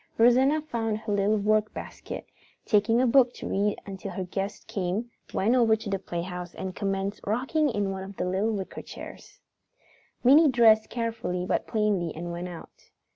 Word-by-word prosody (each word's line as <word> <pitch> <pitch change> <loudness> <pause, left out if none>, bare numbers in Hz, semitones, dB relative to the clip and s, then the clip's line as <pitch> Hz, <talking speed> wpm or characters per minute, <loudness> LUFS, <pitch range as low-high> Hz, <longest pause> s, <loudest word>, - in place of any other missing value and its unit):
Rosanna 260 +6 +4
found 225 -7 -2
her 215 -1 -3
little 200 +2 +2
workbasket 215 +1 -1
and, - - -34
taking 220 +2 +3
a 255 - +4
book 250 0 +4
to - - -6
read 205 +1 0
until 195 -1 -6
her 190 - -4
guests 195 +3 -4
came, 210 +2 -3 0.2
went 215 +5 +2
over 230 -3 +5
to 220 -2 -6
the 195 - 0
playhouse 175 0 -5
and 185 -1 -5
commenced 195 0 -2
rocking 265 +8 +1
in 205 -4 -1
one 190 0 -5
of 195 0 -10
the - - -1
little 190 +4 0
wicker 200 -4 -4
chairs. - - -11 0.8
Minnie 290 +5 +7
dressed 225 -3 +5
carefully 225 -6 -2
but - - -1
plainly 205 -7 0
and 170 +2 -5
went 175 +1 -4
out. 175 -2 -12
210 Hz, 175 wpm, -27 LUFS, 190-230 Hz, 0.8 s, Minnie